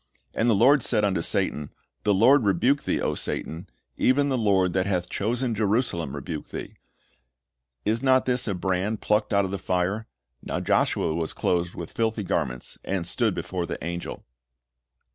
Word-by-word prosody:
And 115 - +1
the 115 - +4
Lord 135 +7 +5
said 105 -2 +2
unto 95 -4 +1
Satan, 75 -3 -1 0.4
The 105 - +4
Lord 130 +7 +6
rebuke 125 +8 +2
thee, - - 0
O - - 0
Satan; 85 +4 -3 0.3
even 140 +3 +3
the 135 - +1
Lord 95 -5 +2
that 95 0 +1
hath 90 -3 -1
chosen 120 +4 -1
Jerusalem 105 - 0
rebuke 75 -2 -5
thee: - - -7 1.1
is 110 +2 +1
not 130 -1 +4
this 125 -1 0
a 100 - 0
brand 95 +4 -1
plucked 105 0 +1
out 100 -1 +3
of 95 - -4
the 100 - -3
fire? 95 +4 -1 0.3
Now - - -3
Joshua 80 - +1
was 80 -1 -2
clothed 90 0 0
with 85 - -7
filthy 110 -2 -1
garments, 60 -8 -3
and 95 -3 -2
stood - - +1
before 90 -2 -3
the - - -4
angel." 85 +1 -5
100 Hz, 170 wpm, -25 LUFS, 90-115 Hz, 1.1 s, Lord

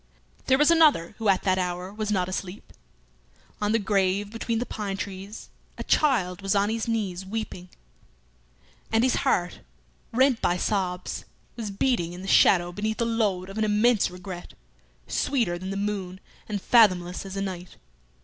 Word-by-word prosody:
There 265 - +5
was 295 +3 +5
another 300 - +4
who 220 -2 +1
at 190 -1 +3
that 185 -1 +2
hour 180 +1 -3
was 215 0 -3
not 185 -4 +1
asleep. 185 +1 -6 0.9
On 210 0 +1
the 225 - +3
grave 200 -1 0
between 230 0 -2
the 240 - -1
pine 200 -4 -4
trees 200 +1 -7 0.3
a - - -4
child 205 -11 +1
was 195 +1 0
on 200 +1 +2
his 225 0 -2
knees 200 -5 -2
weeping, 190 -3 -6 1.2
and 225 +1 +3
his 255 - +2
heart, 175 0 0 0.5
rent 255 0 +3
by 175 - +1
sobs, 180 -2 -2 0.3
was 225 -3 -5
beating 195 -4 0
in 180 +1 -8
the - - -7
shadow 175 -2 +5
beneath 215 +4 -2
the 235 - 0
load 210 -6 0
of 195 +3 -6
an - - +2
immense 215 +1 +3
regret, 180 0 -9 0.5
sweeter 225 -11 0
than 190 +1 -6
the 195 - -3
moon 195 -2 -3 0.3
and 205 -2 -3
fathomless 185 -7 +4
as 195 0 -8
the 195 - -2
night. 185 -2 -6
200 Hz, 170 wpm, -26 LUFS, 185-225 Hz, 1.2 s, There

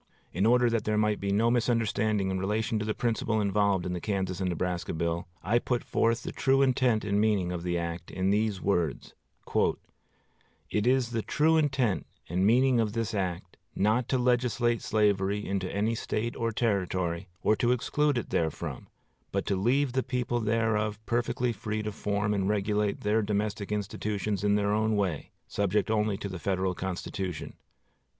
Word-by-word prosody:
In 95 +5 +2
order 125 +1 +5
that 115 -2 0
there 105 0 0
might 105 -1 +2
be 100 0 -2
no 115 +4 +3
misunderstanding 110 -4 +1
in 95 - -1
relation 110 +3 0
to 105 - -2
the 110 - -1
principle 115 -2 0
involved 100 -2 +1
in 90 - -2
the 90 - -4
Kansas 95 -3 -2
and 95 - 0
Nebraska 90 0 -2
bill, 85 +1 -2 0.2
I 115 +5 +2
put 120 0 -1
forth 115 +1 +1
the - - -4
true 135 0 +3
intent 125 -5 +2
and 100 0 +1
meaning 100 -5 +1
of 90 -1 -3
the 85 0 -1
act 85 0 -4
in 95 +1 0
these 105 -1 +1
words: 85 -8 -1 1.6
"It 105 +2 +1
is 125 -2 +2
the 115 -1 -1
true 155 +7 +2
intent 130 -9 +1 0.2
and 90 +4 +1
meaning 125 +2 +4
of 110 -2 0
this 115 -1 -2
act 90 -2 -3 0.2
not 110 +4 +1
to 130 - +2
legislate 120 -1 +1
slavery 105 -1 +1
into 95 -1 -2
any 105 +3 0
State 115 +1 -2
or 115 0 -1
Territory, 95 -5 -1 0.2
or 110 - +4
to 120 - +2
exclude 145 +3 +1
it 120 - -4
therefrom, 80 -3 -2 0.4
but - - -1
to 100 - 0
leave 125 +7 +1
the 130 - +2
people 125 -1 -1
thereof 110 -1 0
perfectly 120 0 0
free 110 0 -3
to 105 - -3
form 105 0 -1
and 100 -1 0
regulate 105 0 0
their 105 +2 +2
domestic 105 0 -2
institutions 105 -1 -2
in 105 0 +3
their 100 0 +1
own 110 0 +1
way, 95 -8 -1 0.2
subject 100 +2 0
only 105 -2 +1
to 100 - -5
the 95 -2 -6
Federal 95 -1 0
Constitution." 90 -2 -4
105 Hz, 175 wpm, -28 LUFS, 95-115 Hz, 1.6 s, order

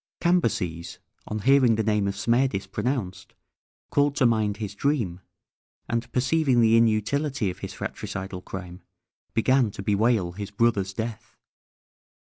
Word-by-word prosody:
Cambyses, 90 - 0 0.3
on 105 0 -3
hearing 130 -2 +5
the 110 - 0
name 105 -2 +1
of 100 - -2
Smerdis 115 -1 +1
pronounced, 100 -1 -3 0.6
called 145 0 +2
to 135 - +3
mind 110 -3 +2
his 105 -2 -5
dream, 105 - -1 0.7
and 115 0 -2
perceiving 130 0 +2
the 115 -1 +5
inutility 115 +1 +1
of - - -12
his - - -6
fratricidal 95 -1 -5
crime, 90 -1 -8 0.5
began 130 +1 +3
to 100 - -8
bewail 105 -2 +2
his 100 +3 -6
brother's 105 -2 +1
death. 110 +1 -6
110 Hz, 130 wpm, -25 LUFS, 100-125 Hz, 0.7 s, hearing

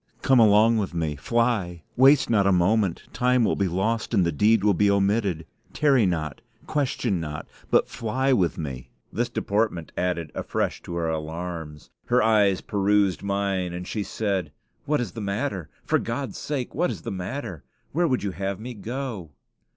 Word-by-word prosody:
"Come 130 -2 +5
along 110 +1 +5
with 95 -4 -3
me; 80 -3 -1
fly; 95 - 0
waste 135 +2 +6
not 100 -4 +3
a - - +4
moment; 95 +1 +2
time 125 0 +2
will - - +1
be 100 - +1
lost, 105 +6 -1
and 95 - +4
the 85 - +1
deed 105 +7 +3
will 105 -1 +4
be 100 +3 +3
omitted. 100 -4 +1 0.3
Tarry 135 -8 +3
not, 75 -5 -3 0.2
question 130 - -1
not, 75 -2 -5 0.2
but - - +3
fly 130 +4 0
with 90 -8 +1
me." 70 -6 -6 0.2
This 120 +2 -1
deportment 105 -6 -1
added 85 -3 -2
afresh - - -2
to 85 - -5
her 85 -1 -1
alarms. 80 -1 -5 0.2
Her 125 0 +3
eyes 105 -4 +3
pursued 100 -2 +1
mine, 100 -3 -1
and 90 0 -6
she 105 - -3
said, 100 -6 -2 0.3
"What 150 -2 +1
is 115 -7 -3
the 110 - -7
matter? 100 - -3 0.2
For - - +2
God's 120 0 -4
sake, 140 -5 -3
what - - +1
is - - -6
the - - -4
matter? 95 - -5 0.3
Where 170 +3 +2
would 130 -7 0
you 100 - -1
have 95 +2 -3
me 125 +3 -6
go?" 115 - -5
100 Hz, 175 wpm, -25 LUFS, 90-115 Hz, 0.3 s, waste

